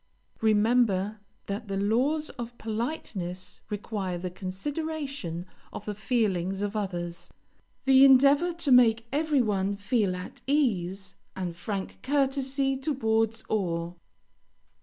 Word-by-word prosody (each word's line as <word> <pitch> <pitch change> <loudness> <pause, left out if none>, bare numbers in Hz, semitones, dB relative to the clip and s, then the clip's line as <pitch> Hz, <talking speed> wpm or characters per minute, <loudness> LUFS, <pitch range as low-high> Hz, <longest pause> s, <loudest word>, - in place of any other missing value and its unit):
Remember 215 -2 +3 0.3
that 205 +3 -4
the 195 -1 -2
laws 255 +10 +1
of 240 0 -7
politeness 215 - -4
require 205 -3 -3
the 180 +1 -5
consideration 270 - -4 0.3
of - - -8
the 210 - -3
feelings 195 -3 0
of 205 +1 -3
others; 175 -4 -4 0.6
the 265 0 +7
endeavor 280 +5 +6
to 335 -4 -1
make 230 -2 +6
every 295 -2 +2
one 200 -2 0
feel 200 -1 0
at 180 0 -8
ease; 195 - 0 0.2
and 180 -3 -4
frank 195 +2 -5
courtesy 270 0 +1
towards 225 -6 0
all. 175 -4 -2
220 Hz, 115 wpm, -28 LUFS, 190-270 Hz, 0.6 s, the